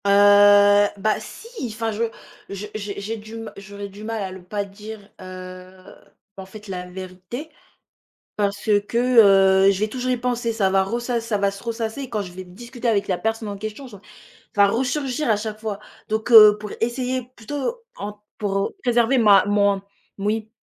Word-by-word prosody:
Heu 205 0 +6
bah 215 +2 0
si! 460 - -8
Enfin 225 0 -3
je 215 +2 -2 0.5
je 200 +1 -6
j'ai 205 -2 -5
j'ai 215 +3 -4
du 215 +1 -11
ma 225 -1 -8
j'aurais 200 0 -8
du 200 +2 -12
mal 225 0 -3
à 190 - -5
ne 190 - -9
pas 200 +3 -4
dire, 210 +2 -10 0.2
heu 185 0 -10 0.6
en 190 - -8
fait, 210 +2 -12
la 180 -2 -5
vérité, 185 - -8 0.9
parce 205 +1 -2 0.2
que, 235 - -2 0.7
heu, - - +7
je 195 - -3
vais 215 - +1
toujours 255 +3 -3
y 250 - +1
penser, 240 -1 -1
ça 200 -4 +1
va 190 0 +3
ressass 235 +3 -2
ça 215 -3 -1
va 200 0 +2
se 200 0 -10
ressasser 230 +2 -4
et 265 - -6
quand 215 -3 -1
je 185 -3 -8
vais 185 +1 -8
discuter 235 +7 -7
avec 210 -3 +1
la 185 - 0
personne 225 +1 -2
en 200 -1 -5
question 215 +6 -7
je 210 -5 -12
ça - - -21 0.5
va 200 -1 +6
resurgir 260 +4 -1
à 220 - +4
chaque 215 0 -5
fois. 215 -2 -4 0.3
Donc, 220 +2 -2
heu, 210 -2 +9
pour 210 -1 -7
essayer 250 +2 -1
plutôt 290 - -4
en 205 +1 -7 0.2
pour 195 -2 -1
préserver 240 +1 +3
ma 205 -5 +6
mon 200 -1 +2 0.4
moui, 215 +2 -2
210 Hz, 190 wpm, -22 LUFS, 200-230 Hz, 0.9 s, heu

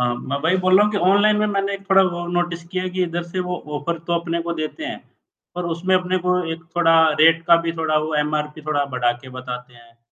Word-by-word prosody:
अ, - - +2 0.3
मैं 140 - 0
वही 180 +3 +3
बोल 185 0 +4
रहा 205 - +6
हूँ 210 - 0
कि 200 - 0
ऑनलाइन 210 +1 +4
में 210 0 +1
मैंने 200 -1 -1
एक 195 0 -10
थोड़ा 195 0 +7 0.2
और 175 0 -5
नोटिस 175 -1 -2
किया 185 +2 -4
है 185 - -3
कि 185 - +2
इधर 175 0 -2
से 185 - -2
वो 180 - -2 0.2
ऑफर 170 +3 -3
तो 170 - -2
अपने 170 0 -3
को 170 - -3
देते 235 - -5
हैं, - - -5 0.6
पर 180 0 -4
उसमें 185 +2 +1
अपने 185 0 0
को 180 0 +3
एक 165 0 -9
थोड़ा 165 -1 +5 0.2
रेट 165 +1 +5
का 170 -1 +7
भी 165 - 0
थोड़ा 155 -1 +1
वो 155 0 -3
एमआरपी 150 0 -3
थोड़ा 145 -2 +1
बढ़ा 120 -1 +2
के 130 - -11
बताते 125 -1 -7
हैं। 115 0 -20
170 Hz, 255 wpm, -21 LUFS, 155-185 Hz, 0.6 s, थोड़ा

